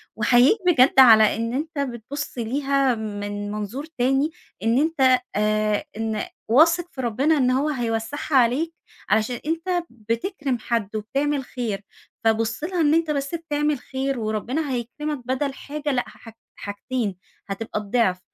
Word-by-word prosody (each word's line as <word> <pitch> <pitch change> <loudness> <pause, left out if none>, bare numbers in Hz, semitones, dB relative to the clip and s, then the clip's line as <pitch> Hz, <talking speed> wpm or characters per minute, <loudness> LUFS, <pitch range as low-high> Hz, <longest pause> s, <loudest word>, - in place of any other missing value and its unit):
وأحييك 245 - +5
بجد 270 -5 +5
على 220 -4 +8
إن 230 +1 -2
أنت 305 +2 -3
بتبُص 265 +2 -4
ليها 270 +2 +1
من 205 -1 -4
منظور 215 +7 -4
تاني، 270 0 0 0.3
إن 230 +2 +3
أنت 270 -5 +3 0.2
آآ، 215 0 +1
إن 220 -1 -2 0.2
واثق 330 +8 +4
في 265 -1 -6
ربنا 265 +7 +2
إن 255 -2 +3
هو 275 +4 +1
هيوسعها 245 +2 -2
عليك، 265 +8 +2 0.4
علشان 220 +3 +1
أنت 345 +2 -1
بتكرم 240 - -3
حد، 220 -2 -2
وبتعمل 275 +6 -1
خير، 225 -6 -4 0.4
فبُص 225 +4 +1
لها 350 +1 -1
إن 300 0 +4
أنت 325 -1 +2
بس 280 +2 -2
بتعمل 295 -3 -1
خير 265 0 -3
وربنا 235 +7 -2
هيكرمك 255 +2 -4
بدل 270 +2 -1
حاجة 290 +2 -4
لأ، 250 -2 +1
حاحج 225 - -14 0.2
حاجتين 205 0 -3 0.3
هتبقى 210 +1 -4
الضعف، 205 -3 +1
255 Hz, 140 wpm, -23 LUFS, 225-290 Hz, 0.4 s, على